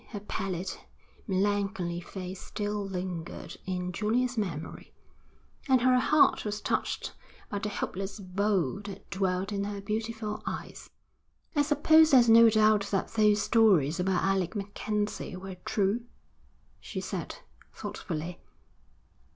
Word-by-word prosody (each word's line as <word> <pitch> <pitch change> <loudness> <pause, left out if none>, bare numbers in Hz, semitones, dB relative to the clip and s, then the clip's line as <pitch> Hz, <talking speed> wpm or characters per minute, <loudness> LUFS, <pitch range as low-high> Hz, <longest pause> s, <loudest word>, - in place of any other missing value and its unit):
Her 210 - -6
pallid, 190 -3 -3 0.5
melancholy 195 -3 0
face 185 +1 -7
still 205 0 -3
lingered 180 -3 -5
in 180 -1 -2
Julia's 235 +7 0
memory, 170 -8 -4 0.8
and 260 -1 +6
her 255 0 +5
heart 300 +3 +4
was 210 0 -3
touched - - -2 0.4
by 205 - -2
the 210 - -3
hopeless 195 0 -4
woe 195 -4 0
that 200 -1 -9
dwelt 190 +1 -1
in 200 -1 -1
her 205 0 -4
beautiful 215 +1 -3
eyes. - - -6 0.7
'I 290 - +4
suppose 315 +2 +5
there's 245 -5 +6
no 230 0 +9
doubt 215 -2 +4
that 195 - 0
those 210 -2 +3
stories 190 - +4
about 180 0 +1
Alec 190 0 0
MacKenzie 205 0 -3
were 185 0 -8
true?' 215 +2 0 0.7
she - - -6
said, - - -4 0.4
thoughtfully. 165 +1 -5
200 Hz, 125 wpm, -29 LUFS, 185-215 Hz, 0.8 s, no